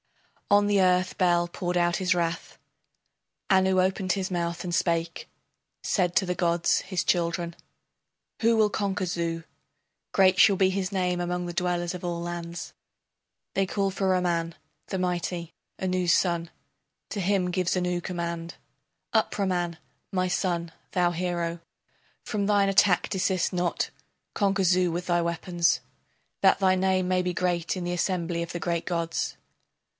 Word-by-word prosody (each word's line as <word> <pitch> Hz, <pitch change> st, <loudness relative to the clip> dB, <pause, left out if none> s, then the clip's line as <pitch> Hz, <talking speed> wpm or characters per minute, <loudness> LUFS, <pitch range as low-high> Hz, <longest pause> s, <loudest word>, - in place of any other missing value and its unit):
On 205 Hz, 0 st, +5 dB
the 205 Hz, -1 st, +3 dB
earth 185 Hz, 0 st, +2 dB
Bel 175 Hz, -2 st, +3 dB
poured 175 Hz, +1 st, -3 dB
out 175 Hz, 0 st, +2 dB
his 185 Hz, 0 st, +2 dB
wrath. 170 Hz, -1 st, -2 dB, 0.9 s
Anu 190 Hz, 0 st, +4 dB
opened 185 Hz, 0 st, +1 dB
his 190 Hz, -1 st, -3 dB
mouth 170 Hz, -1 st, -2 dB
and 175 Hz, -, -3 dB
spake, 170 Hz, -1 st, -1 dB, 0.5 s
Said 180 Hz, -3 st, +1 dB
to 180 Hz, -, +3 dB
the 180 Hz, 0 st, -1 dB
gods 170 Hz, 0 st, +2 dB
his 185 Hz, -2 st, -2 dB
children: 170 Hz, -1 st, 0 dB, 0.9 s
Who 230 Hz, 0 st, +4 dB
will 215 Hz, -1 st, +4 dB
conquer 200 Hz, -2 st, -1 dB
Zu? 170 Hz, -1 st, -2 dB, 0.7 s
Great 185 Hz, -1 st, +4 dB
shall 200 Hz, -2 st, +6 dB
be 190 Hz, 0 st, +4 dB
his 190 Hz, 0 st, -2 dB
name 180 Hz, -2 st, 0 dB
among 180 Hz, 0 st, -2 dB
the 175 Hz, -, -5 dB
dwellers 175 Hz, 0 st, -1 dB
of 180 Hz, -, -7 dB
all 175 Hz, -1 st, -2 dB
lands. 170 Hz, 0 st, -5 dB, 0.8 s
They 195 Hz, -1 st, +2 dB
called 195 Hz, 0 st, -1 dB
for 190 Hz, 0 st, 0 dB
Ramman, 170 Hz, -3 st, 0 dB, 0.3 s
the 190 Hz, -, -3 dB
mighty, 175 Hz, -2 st, -2 dB, 0.3 s
Anu's 180 Hz, -2 st, +1 dB
son. 170 Hz, -2 st, +1 dB, 0.6 s
To 205 Hz, -, -2 dB
him 185 Hz, -1 st, +1 dB
gives 180 Hz, 0 st, 0 dB
Anu 180 Hz, -1 st, 0 dB
command: 170 Hz, -1 st, -4 dB, 0.6 s
Up, 220 Hz, -1 st, +2 dB
Ramman, 175 Hz, -4 st, -1 dB, 0.3 s
my 185 Hz, -1 st, +1 dB
son, 170 Hz, -2 st, -1 dB, 0.2 s
thou 175 Hz, -1 st, +2 dB
hero, 175 Hz, -1 st, -2 dB, 0.7 s
From 205 Hz, -2 st, -1 dB
thine 205 Hz, -1 st, +3 dB
attack 195 Hz, -1 st, +4 dB
desist 190 Hz, -2 st, 0 dB
not, 175 Hz, -1 st, -1 dB, 0.4 s
conquer 200 Hz, -1 st, +1 dB
Zu 180 Hz, 0 st, +3 dB
with 175 Hz, +2 st, -3 dB
thy 175 Hz, -1 st, +2 dB
weapons, 170 Hz, 0 st, +1 dB, 0.6 s
That 190 Hz, 0 st, +5 dB
thy 190 Hz, -1 st, +4 dB
name 185 Hz, 0 st, +1 dB
may 185 Hz, 0 st, +2 dB
be 180 Hz, 0 st, -2 dB
great 175 Hz, 0 st, 0 dB
in 180 Hz, -, -4 dB
the 175 Hz, -, -1 dB
assembly 175 Hz, -1 st, -1 dB
of 170 Hz, -, -7 dB
the 175 Hz, -, -4 dB
great 170 Hz, -1 st, -2 dB
gods. 170 Hz, -2 st, -2 dB
180 Hz, 155 wpm, -27 LUFS, 170-190 Hz, 0.9 s, shall